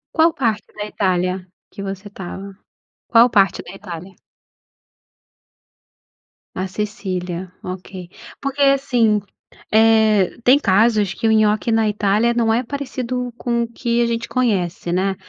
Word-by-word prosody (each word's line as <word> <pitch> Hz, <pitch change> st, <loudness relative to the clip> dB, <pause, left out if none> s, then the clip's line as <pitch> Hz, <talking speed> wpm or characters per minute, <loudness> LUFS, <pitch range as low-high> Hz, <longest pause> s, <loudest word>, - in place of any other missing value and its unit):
Qual 325 Hz, +1 st, +5 dB
parte 230 Hz, -8 st, -2 dB
da 210 Hz, -, -4 dB
Itália 185 Hz, -2 st, -1 dB, 0.3 s
que 200 Hz, -, -8 dB
você 195 Hz, +1 st, -6 dB
estava? 195 Hz, 0 st, -8 dB, 0.5 s
Qual 235 Hz, +1 st, +5 dB
parte 195 Hz, -5 st, +3 dB
da -, -, -11 dB
Itália? 185 Hz, -2 st, -9 dB, 2.4 s
A 185 Hz, +1 st, -2 dB
Sicília, 185 Hz, -3 st, -4 dB
ok. 185 Hz, -1 st, -7 dB, 0.3 s
Porque 275 Hz, 0 st, -3 dB
assim, 250 Hz, -6 st, +3 dB, 0.5 s
eh, 220 Hz, -3 st, +4 dB
tem 265 Hz, +3 st, +6 dB
casos 210 Hz, -2 st, +3 dB
que 225 Hz, -, -1 dB
o -, -, +4 dB
nhoque 215 Hz, +1 st, +2 dB
na 225 Hz, -1 st, +2 dB
Itália 210 Hz, +3 st, +2 dB
não 230 Hz, -2 st, +2 dB
é 240 Hz, +3 st, +1 dB
parecido 255 Hz, -2 st, -4 dB
com 235 Hz, -1 st, 0 dB
o -, -, -4 dB
que 235 Hz, 0 st, -1 dB
a -, -, +2 dB
gente 230 Hz, 0 st, -2 dB
conhece, 190 Hz, -9 st, -1 dB
né. 190 Hz, +2 st, 0 dB
215 Hz, 135 wpm, -20 LUFS, 190-235 Hz, 2.4 s, tem